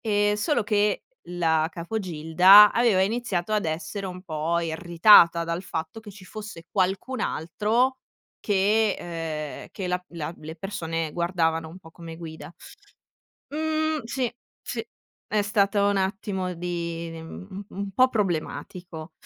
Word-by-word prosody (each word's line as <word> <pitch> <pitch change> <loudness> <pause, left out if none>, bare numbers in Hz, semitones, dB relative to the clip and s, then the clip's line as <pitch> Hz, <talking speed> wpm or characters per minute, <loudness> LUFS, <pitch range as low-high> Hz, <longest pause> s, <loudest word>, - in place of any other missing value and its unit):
Ehm, 205 -1 +2
solo 235 +6 +1
che 210 -1 +1 0.3
la 160 -3 +1
capo 175 +6 -4
gilda, 180 +3 +7
aveva 230 -6 +3
iniziato 210 -3 -1
ad 210 -4 +1
essere 160 +5 -4
un 180 -1 -7
po' 165 -1 -1
irritata 170 +1 +5
dal 170 +2 -3
fatto 165 +3 -5
che 215 -2 -11
ci 195 -1 -14
fosse 205 -3 -9
qualcun 195 +8 -1
altro 225 +10 0 0.4
che 205 +1 +2
uhm, 160 -3 -5
che 190 - -5
la 180 0 -1
la 165 -1 -6
le 160 +1 -9
persone 165 -4 -4
guardavano 165 -2 0
un 175 +4 -11
po' 165 -3 -15
come 165 -1 -10
guida. 160 -2 -9 1.0
Mhmm, 315 +1 -1
sì, 245 +2 -1 0.3
sì, - - -5 0.4
è 210 -1 +1
stato 205 -1 +2
un 205 0 +2
attimo 190 -1 -2
di 170 -1 -4
u 190 +4 -9
un 200 0 -5
po' 255 +6 +5
problematico. 175 - -4
185 Hz, 135 wpm, -25 LUFS, 165-210 Hz, 1.0 s, gilda